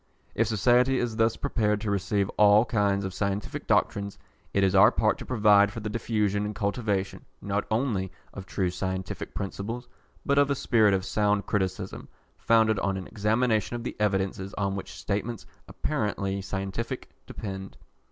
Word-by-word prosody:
If 115 - +1
society 125 +4 +3
is 120 -3 -2
thus 115 -1 +2
prepared 105 -7 0
to 105 -1 -1
receive 100 0 0
all 105 +2 +5
kinds 100 -3 +1
of 95 - -4
scientific 100 +1 -3
doctrines, 100 -1 +1 0.3
it 100 - +2
is 95 0 +3
our 100 +2 +8
part 110 -3 +1
to - - -8
provide 105 -4 +5
for 115 - -6
the 105 -1 -4
diffusion 105 -3 0
and 105 0 -4
cultivation, 100 -2 -2 0.2
not 100 +1 -2
only 110 -5 0 0.2
of 95 -1 -8
true 95 -2 -1
scientific 95 0 -4
principles, 115 +5 -4 0.4
but 140 0 +3
of 145 0 +4
a 140 - +2
spirit 110 -7 +3
of 95 0 -2
sound 105 -1 +1
criticism, 95 -2 -2 0.3
founded 110 -2 +3
on 95 0 -1
an 95 - -6
examination 110 +2 0
of 120 - -5
the - - -4
evidences 95 -1 -1
on 100 -1 -1
which 95 - -6
statements 105 +2 -3 0.2
apparently 100 -8 -2
scientific 95 +3 -4 0.2
depend. 95 -2 -7
105 Hz, 160 wpm, -27 LUFS, 95-115 Hz, 0.4 s, our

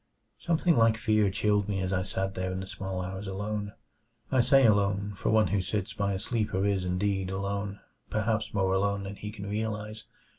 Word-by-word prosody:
Something 170 0 +2
like 115 -1 +5
fear 110 -3 +3
chilled 105 0 +1
me 100 -1 0
as 95 0 -1
I 95 - +1
sat 95 +1 -2
there 95 -1 -2
in 95 +1 -3
the - - -5
small 95 -1 -4
hours 95 +2 -5
alone 105 +1 -3 0.6
I 130 -2 +5
say 135 +2 +5
alone, 100 -1 +2
for - - -2
one 110 -1 +4
who 100 -1 +1
sits 95 +1 -2
by 100 -1 0
a 95 - -2
sleeper 105 -3 -1
is 100 -2 +1
indeed 95 +1 0
alone; 100 +1 -3 0.3
perhaps 110 0 0
more 95 -2 +1
alone 100 +1 +1
than 100 +1 -6
he 105 - -6
can 100 -2 -8
realize. 105 0 -3
100 Hz, 195 wpm, -29 LUFS, 95-105 Hz, 0.6 s, like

